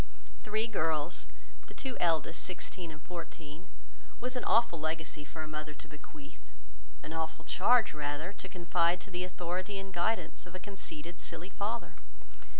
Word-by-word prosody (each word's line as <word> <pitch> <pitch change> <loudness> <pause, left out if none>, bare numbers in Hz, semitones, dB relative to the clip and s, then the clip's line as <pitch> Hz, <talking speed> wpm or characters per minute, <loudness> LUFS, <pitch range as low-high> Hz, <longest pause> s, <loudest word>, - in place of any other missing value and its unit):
—Three 215 +1 +3
girls, 165 -7 +1 0.4
the - - -11
two 260 -2 -2
eldest 165 -1 +3
sixteen 180 -1 -4
and 155 -1 -8
fourteen, 165 -1 -6 0.5
was 255 +1 -1
an 250 - 0
awful 230 -8 +5
legacy 155 -1 -1
for 155 +2 -5
a - - -5
mother 155 0 -4
to - - -10
bequeath, 150 -1 -12 0.5
an 155 - -4
awful 160 0 -2
charge 225 -1 +6
rather, 150 +4 -1
to 190 - -7
confide 175 0 +3
to 200 - -9
the 180 0 0
authority 180 +2 -1
and 195 0 -5
guidance 180 +1 +1
of 180 - -9
a - - -3
conceited, 175 -3 -3
silly 170 +2 -2
father. 220 +5 -1
175 Hz, 155 wpm, -34 LUFS, 155-195 Hz, 0.5 s, charge